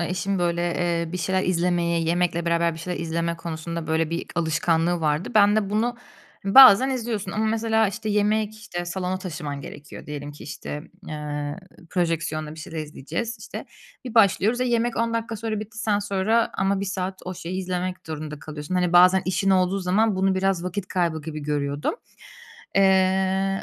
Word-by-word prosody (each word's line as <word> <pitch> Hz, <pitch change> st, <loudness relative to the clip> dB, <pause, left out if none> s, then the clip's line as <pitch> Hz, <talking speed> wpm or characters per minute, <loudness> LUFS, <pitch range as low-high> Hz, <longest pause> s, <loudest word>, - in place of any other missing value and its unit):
ııı, 170 Hz, -, -1 dB
eşim, 185 Hz, +2 st, -2 dB
ııı, 195 Hz, -, +1 dB
böyle 170 Hz, 0 st, 0 dB
bir 180 Hz, -, -3 dB
şeyler 185 Hz, +3 st, 0 dB
izlemeye, 175 Hz, -1 st, +1 dB
yemekle 170 Hz, +1 st, 0 dB
beraber 170 Hz, 0 st, +2 dB
bir -, -, -9 dB
şeyler 180 Hz, +2 st, -4 dB
izleme 170 Hz, 0 st, -2 dB
konusunda 165 Hz, 0 st, -5 dB
böyle 160 Hz, 0 st, 0 dB
bir 170 Hz, -, -3 dB
alışkanlığı 165 Hz, +1 st, +1 dB
vardı. 150 Hz, +1 st, 0 dB
Ben 205 Hz, 0 st, +6 dB
de 205 Hz, -2 st, 0 dB
bunu 230 Hz, +3 st, 0 dB, 0.5 s
bazen 255 Hz, +3 st, +9 dB
izliyorsun 235 Hz, -5 st, -3 dB
ama 215 Hz, -, 0 dB
mesela 220 Hz, 0 st, +2 dB
işte 215 Hz, +2 st, -5 dB
yemek, 210 Hz, +1 st, +1 dB
işte 180 Hz, -5 st, -6 dB
salona 185 Hz, +1 st, -3 dB
taşıman 155 Hz, -6 st, -5 dB
gerekiyor 145 Hz, +1 st, -10 dB
diyelim 145 Hz, 0 st, -6 dB
ki, 145 Hz, -, -12 dB
işte, 150 Hz, 0 st, -6 dB, 0.3 s
ııı, 150 Hz, -1 st, -4 dB, 0.3 s
projeksiyonla 160 Hz, -3 st, -1 dB
bir 160 Hz, -, -10 dB
şeyler 165 Hz, -2 st, -7 dB
izleyeceğiz, 155 Hz, -, -4 dB
işte. -, -, -7 dB, 0.4 s
Bir 245 Hz, -, -7 dB
başlıyoruz 225 Hz, +2 st, +4 dB
ve -, -, +2 dB
yemek 240 Hz, -1 st, +1 dB
10 230 Hz, 0 st, 0 dB
dakika 225 Hz, -1 st, -2 dB
sonra 215 Hz, -1 st, -3 dB
bitti, 220 Hz, +1 st, -9 dB
sen 215 Hz, -2 st, +1 dB
sonra 205 Hz, +3 st, +1 dB
ama 195 Hz, 0 st, +1 dB
1 200 Hz, -, -1 dB
saat 190 Hz, -1 st, -3 dB
o 185 Hz, 0 st, -5 dB
şeyi 180 Hz, +3 st, -4 dB
izlemek 185 Hz, 0 st, -3 dB
durumunda 155 Hz, -1 st, -6 dB
kalıyorsun. 150 Hz, +3 st, -6 dB
Hani, 180 Hz, -1 st, +1 dB
bazen 180 Hz, +1 st, +6 dB
işin 195 Hz, +1 st, +1 dB
olduğu 185 Hz, 0 st, +3 dB
zaman 195 Hz, +3 st, +2 dB
bunu 190 Hz, 0 st, +2 dB
biraz 190 Hz, -2 st, 0 dB
vakit 185 Hz, +1 st, -4 dB
kaybı 170 Hz, -3 st, 0 dB
gibi 155 Hz, 0 st, -6 dB
görüyordum. 145 Hz, -, -1 dB, 0.8 s
Iıı, 190 Hz, 0 st, +3 dB
180 Hz, 175 wpm, -24 LUFS, 165-205 Hz, 0.8 s, bazen